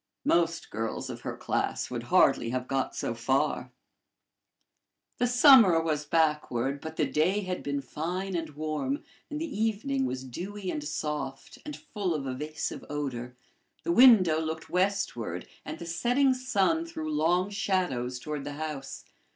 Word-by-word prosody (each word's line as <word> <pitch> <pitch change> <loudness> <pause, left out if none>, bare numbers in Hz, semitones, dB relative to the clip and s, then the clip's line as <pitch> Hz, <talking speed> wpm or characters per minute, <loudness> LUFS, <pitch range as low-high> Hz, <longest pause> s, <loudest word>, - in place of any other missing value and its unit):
Most 170 -1 +1
girls 110 +1 -3
of - - -8
her - - -5
class - - -2
would - - -3
hardly 115 - +4
have 125 +1 -2
got 135 -1 -1
so - - -2
far. 125 +4 0 1.5
The 245 - +3
summer 245 - +7
was 155 -2 -1
backward, 145 -4 +1
but 160 0 -7
the 155 - +2
day 160 +9 +1
had 185 -2 -3
been 140 0 -2
fine 180 +7 -3
and 165 -2 -2
warm, 150 -3 -2 0.3
and 300 - -4
the 325 - -2 0.2
evening 260 +5 0
was 130 0 -4
dewy 185 +9 -5
and 150 - -4
soft, 150 -3 -4
and 300 - -5
full 195 -6 -3
of 140 -3 -3
evasive 150 +4 -4
odor. 130 -4 -4 0.5
The 340 - 0
window 220 - +7
looked 160 0 -4
westward, 195 +2 -1 0.2
and - - -6
the 170 - -8
setting 245 +11 +2
sun 255 - +1
threw 155 - -5
long 175 +6 +2
shadows 135 -12 -1
toward 150 +1 -5
the 145 +1 -5
house. 150 -2 -6
160 Hz, 150 wpm, -28 LUFS, 140-195 Hz, 1.5 s, summer